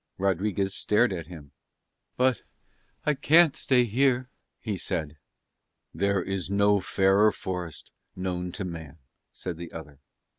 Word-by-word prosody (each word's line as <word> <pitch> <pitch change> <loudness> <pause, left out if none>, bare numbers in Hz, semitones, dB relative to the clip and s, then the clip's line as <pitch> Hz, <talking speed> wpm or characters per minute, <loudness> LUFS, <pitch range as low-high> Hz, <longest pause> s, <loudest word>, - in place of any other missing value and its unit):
Rodriguez 95 +1 0
stared 105 0 +2
at 85 -3 -5
him. 80 -5 -11 0.7
"But 130 -3 +2 0.6
I 150 - +3
can't 160 +2 +5
stay 125 -2 +3
here!" 125 +2 +1 0.3
he 110 -3 -3
said. 75 -4 -3 0.7
"There 100 +2 +1
is 95 -1 -3
no 100 +1 +3
fairer 95 +3 +3
forest 90 -7 -6 0.2
known 90 -1 -3
to 95 - -4
man," 80 -4 -8 0.3
said 90 -3 -6
the 85 0 -8
other. 75 -3 -10
95 Hz, 125 wpm, -27 LUFS, 85-105 Hz, 0.7 s, can't